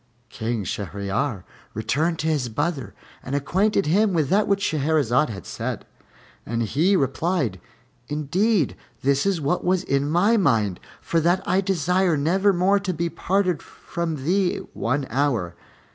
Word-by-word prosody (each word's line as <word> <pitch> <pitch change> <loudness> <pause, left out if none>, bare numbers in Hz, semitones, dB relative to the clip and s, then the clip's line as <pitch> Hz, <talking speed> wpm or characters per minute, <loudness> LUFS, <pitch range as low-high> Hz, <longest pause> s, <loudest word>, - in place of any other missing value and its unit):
King 110 -1 -3
Shahryar 100 - -3 0.3
returned 150 +10 0
to 160 - -2
his 145 -6 0
brother 145 +3 -2 0.3
and 130 - -4
acquainted 195 +8 +1
him 195 +6 +3
with 155 -4 +1
that 205 +2 +3
which 200 0 +1
Shahrazad 150 -2 +2
had 95 -6 -7
said; - - -4 0.6
and 115 0 -2
he 160 - +2
replied, 140 - 0 0.5
"Indeed, 155 - +1 0.3
this 140 +6 +2
is 195 -4 +1
what 150 +4 0
was 185 0 +1
in 140 -2 0
my 200 +8 +3
mind, 110 - +2 0.2
for 165 - 0
that 175 +4 +1
I 185 +2 +3
desire 180 -2 +1
nevermore 190 +5 +3
to 190 -3 -3
be 170 +2 -1
parted 185 -3 0
from 160 -5 -5
thee 185 +2 +2 0.2
one 135 +4 -1
hour. 120 -10 0
155 Hz, 145 wpm, -23 LUFS, 130-185 Hz, 0.6 s, him